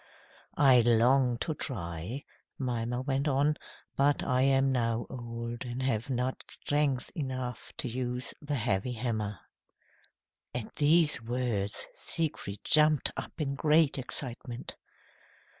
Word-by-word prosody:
"I 135 Hz, -3 st, +7 dB
long 120 Hz, +2 st, +4 dB
to 160 Hz, -, 0 dB
try," 100 Hz, -, -5 dB, 0.3 s
Mimer 125 Hz, -1 st, -2 dB
went 135 Hz, +1 st, 0 dB
on, 145 Hz, +2 st, +2 dB, 0.4 s
"but 140 Hz, +1 st, +2 dB
I 125 Hz, 0 st, +1 dB
am 135 Hz, 0 st, +3 dB
now 115 Hz, -2 st, 0 dB
old 120 Hz, -1 st, -5 dB
and 125 Hz, +1 st, -4 dB
have 120 Hz, -2 st, 0 dB
not 130 Hz, 0 st, -1 dB
strength 145 Hz, -3 st, -1 dB
enough 130 Hz, -5 st, -4 dB
to -, -, -2 dB
use 125 Hz, +1 st, -3 dB
the 145 Hz, 0 st, -2 dB
heavy 105 Hz, 0 st, 0 dB
hammer." 110 Hz, -4 st, -2 dB, 1.2 s
At 120 Hz, -3 st, -4 dB
these 155 Hz, -1 st, +5 dB
words 115 Hz, -4 st, -2 dB
Siegfried 145 Hz, -11 st, -2 dB
jumped 150 Hz, -2 st, +4 dB
up -, -, -5 dB
in 140 Hz, -3 st, -1 dB
great 150 Hz, 0 st, +3 dB
excitement. 125 Hz, -1 st, -2 dB
125 Hz, 120 wpm, -30 LUFS, 120-140 Hz, 1.2 s, I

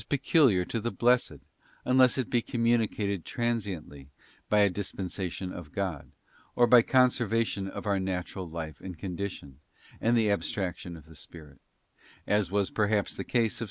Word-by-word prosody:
peculiar 135 Hz, -, +3 dB
to 115 Hz, -, -3 dB
the 120 Hz, -, -2 dB
Blessed, 125 Hz, +1 st, +2 dB, 0.5 s
unless 130 Hz, 0 st, +4 dB
it 130 Hz, -4 st, -1 dB
be 120 Hz, -, +1 dB
communicated 110 Hz, -6 st, 0 dB
tran 120 Hz, -1 st, 0 dB
siently 80 Hz, -10 st, -7 dB, 0.4 s
by 105 Hz, 0 st, +4 dB
a 100 Hz, -, +6 dB
dispensation 95 Hz, -1 st, -4 dB
of 80 Hz, -4 st, -9 dB
God, 95 Hz, -6 st, -4 dB, 0.5 s
or 120 Hz, -, +5 dB
by 120 Hz, 0 st, +7 dB
conservation 115 Hz, -5 st, +1 dB
of 95 Hz, -, -7 dB
our 100 Hz, -2 st, +1 dB
natural 95 Hz, -1 st, -4 dB
life 80 Hz, -3 st, -7 dB
and 90 Hz, -3 st, -8 dB
condition, 90 Hz, -7 st, -6 dB, 0.4 s
and 120 Hz, +1 st, +3 dB
the 110 Hz, -2 st, +3 dB
abstraction 95 Hz, -3 st, -3 dB
of 75 Hz, -, -15 dB
the 80 Hz, 0 st, -15 dB
spirit; 75 Hz, -3 st, -12 dB, 0.7 s
as 105 Hz, -3 st, +1 dB
was 100 Hz, 0 st, 0 dB
perhaps 105 Hz, -1 st, 0 dB
the -, -, -4 dB
case 115 Hz, -3 st, +1 dB
of -, -, -7 dB
S. -, -, -6 dB
100 Hz, 160 wpm, -28 LUFS, 90-115 Hz, 0.7 s, by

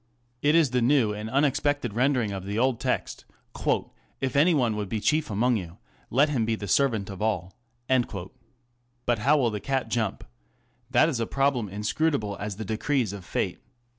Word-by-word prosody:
It 150 Hz, +2 st, +3 dB
is 160 Hz, -6 st, +4 dB
the 125 Hz, -1 st, +1 dB
new 120 Hz, -4 st, +3 dB
and 105 Hz, +1 st, -5 dB
unexpected 140 Hz, -2 st, +1 dB
rendering 125 Hz, -2 st, +1 dB
of 95 Hz, -2 st, -5 dB
the 100 Hz, +2 st, -4 dB
old 125 Hz, 0 st, +2 dB
text 130 Hz, 0 st, -2 dB, 0.3 s
ŌĆö -, -, -1 dB
" -, -, -39 dB
If 125 Hz, -, -13 dB
any 160 Hz, +4 st, +5 dB
one 120 Hz, -6 st, +1 dB
would 105 Hz, -2 st, -3 dB
be 110 Hz, -, -1 dB
chief 155 Hz, +7 st, +1 dB
among 115 Hz, +3 st, +2 dB
you, 85 Hz, -4 st, -7 dB, 0.3 s
let 140 Hz, +5 st, +3 dB
him 130 Hz, -6 st, 0 dB
be 110 Hz, 0 st, 0 dB
the 105 Hz, -2 st, -6 dB
servant 110 Hz, -4 st, +1 dB
of 95 Hz, -, -8 dB
all/' 100 Hz, -5 st, -1 dB, 1.5 s
But 120 Hz, -2 st, +1 dB
how 140 Hz, +7 st, +4 dB
will 125 Hz, -5 st, +2 dB
the 105 Hz, -, -3 dB
cat 135 Hz, +4 st, -2 dB
jump? 110 Hz, -5 st, -1 dB, 0.7 s
That 130 Hz, +4 st, +4 dB
is 140 Hz, -8 st, -1 dB
a 115 Hz, -, -1 dB
problem 135 Hz, -6 st, +1 dB
inscrutable 105 Hz, -, -1 dB
as 105 Hz, -1 st, -4 dB
the 110 Hz, +2 st, -6 dB
decrees 110 Hz, +1 st, 0 dB
of 100 Hz, -2 st, -8 dB
Fate. 90 Hz, 0 st, -2 dB
120 Hz, 190 wpm, -26 LUFS, 105-140 Hz, 1.5 s, any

